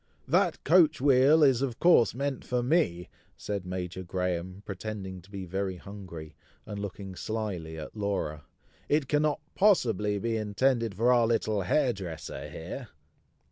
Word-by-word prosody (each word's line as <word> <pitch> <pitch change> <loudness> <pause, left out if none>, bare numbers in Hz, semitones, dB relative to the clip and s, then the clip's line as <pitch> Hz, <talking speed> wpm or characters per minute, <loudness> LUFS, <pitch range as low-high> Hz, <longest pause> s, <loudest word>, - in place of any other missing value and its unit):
"That - - +2
coach 160 -2 +5
wheel 140 +3 +5
is, 135 -3 +4
of 130 -4 -2
course, 120 - +5
meant 140 0 -2
for 125 -1 -1
me!" 120 - +1 0.3
said 100 -3 -4
Major 90 0 -4
Graham, 90 +1 -3
pretending 100 -2 -6
to 95 - -20
be 100 -2 -6
very 95 +1 -2
hungry, 90 -5 -9 0.3
and 105 -1 -6
looking 100 -1 -6
slyly 95 -6 -4
at 80 - -8
Laura; 95 -8 -2 0.5
"It 145 -2 +2
cannot 150 +1 +1
possibly 110 - +3
be 115 +2 -1
intended 115 +1 +1
for 120 +5 +4
our 120 -2 +4
little 110 -3 +1
hair 125 +7 +2
dresser 90 -6 -7
here!" 110 +10 -7
105 Hz, 145 wpm, -29 LUFS, 95-125 Hz, 0.5 s, coach